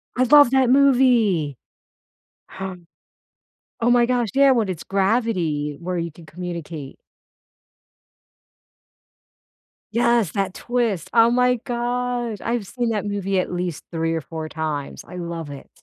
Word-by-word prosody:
I 255 - +3
love 285 0 +7
that 265 -2 +3
movie! 245 - +3 0.9
Hum. 190 -3 -7 1.0
Oh 235 - +3
my 240 -1 +5
gosh, 240 -3 0
yeah, 275 0 +6
when 225 -6 +1
it's 180 - -4
gravity 190 -8 0
where 180 +1 -3
you 170 -1 -3
can 165 +1 -15
communicate. 165 -4 -7 2.9
Yes, 235 -4 +2
that 195 -2 -2
twist, 235 -8 -2
oh 230 0 +6
my 250 +1 +3
gosh, 245 -2 -2
I've 235 -2 -2
seen 240 +3 -2
that 210 -2 -2
movie 195 -2 -1
at - - -2
least 175 -3 -3
3 165 0 -1
or 160 - -2
4 160 -1 -7
times, 150 -3 -4
I 180 - -9
love 170 -3 -5
it. 140 - -10
200 Hz, 135 wpm, -22 LUFS, 170-240 Hz, 2.9 s, love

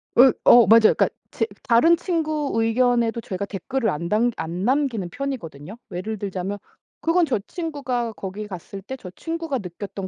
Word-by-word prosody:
으 255 +1 +7
어 240 -1 +8
맞아요. 225 0 +7
그러니까 - - +3 0.2
제 - - 0 0.2
다른 260 +8 +5
친구 310 -5 -1
의견에도 230 0 +2
제가 200 -1 -4
댓글을 220 +5 -2
안 170 +1 -3
담 230 +3 +2
안 170 +3 -4
남기는 250 -7 0
편이거든요. 200 - -6
예를 200 +5 -4
들자면 195 0 -4 0.4
그건 335 +2 +3
저 255 -8 0
친구가 275 -9 -3
거기 200 +2 -6
갔을 195 +1 -8
때 265 +7 -7
저 185 -8 -10
친구가 325 - -4
느꼈던 195 +1 -7
230 Hz, 340 characters per minute, -23 LUFS, 195-270 Hz, 0.4 s, 어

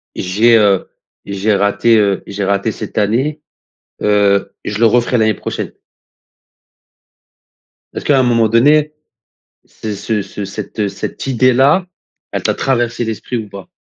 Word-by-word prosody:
j'ai, 110 +6 +3
heu, 100 -4 +2 0.4
j'ai 100 +2 0
raté, 100 +3 +2
heu, 100 -2 +1
j'ai 100 0 -4
raté 100 +3 0
cette - - -8
année, 130 +9 0 0.6
heu, 100 -1 +2
je 105 - -4
le 115 - +4
referai 120 +2 +2
l'année 110 -1 +3
prochaine»? - - -5 2.2
Est-ce - - -6
qu'à 140 -2 +4
un - - +3
moment 115 -2 +2
donné, 150 +7 +3 0.7
ce 110 -1 -7
ce 105 +1 -2
ce 100 +1 -7
cette 105 +1 -4
cette - - -6
idée-là, 130 +7 +3 0.5
elle - - -3
t'a - - +1
traversé 120 -2 -1
l'esprit 115 +2 -4
ou 110 -2 -6
pas? 100 -1 -11
110 Hz, 140 wpm, -16 LUFS, 100-120 Hz, 2.2 s, le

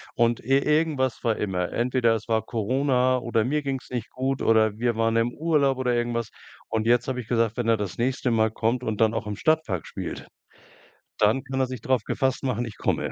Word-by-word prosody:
Und 120 0 +2
ir 135 +3 +1
irgendwas 150 -5 +1
war 115 -2 +2
immer. 90 -3 -2
Entweder 120 -1 +2
es 110 - -6
war 110 -1 +2
Corona 130 +3 +1
oder 120 -3 0
mir 150 +4 0
ging's 135 -2 -4
nicht 120 -3 -4
gut 135 +1 -2
oder 110 -1 +3
wir 120 -1 +1
waren 115 0 +1
im 115 +1 +1
Urlaub 150 -5 +1
oder 125 -2 0
irgendwas. 120 -1 -1 0.4
Und 110 0 -1
jetzt 120 +1 +3
habe 125 -1 -2
ich 115 - -7
gesagt: 115 -1 +1
„Wenn 120 -2 -1
er 115 -1 +4
das 100 -3 -5
nächste 125 +1 0
Mal 110 -1 +3
kommt 115 +3 0
und 110 0 -2
dann 110 0 +4
auch 110 -1 -3
im 105 - -3
Stadtpark 155 - 0
spielt, - - -6 0.9
dann 110 +6 +3
kann 135 -1 -4
er 130 - +2
sich 125 -3 -7
drauf 130 -4 +1
gefasst 130 0 -1
machen, 120 -2 -1
ich 110 - -9
komme.“ - - -1
120 Hz, 215 wpm, -25 LUFS, 110-130 Hz, 0.9 s, er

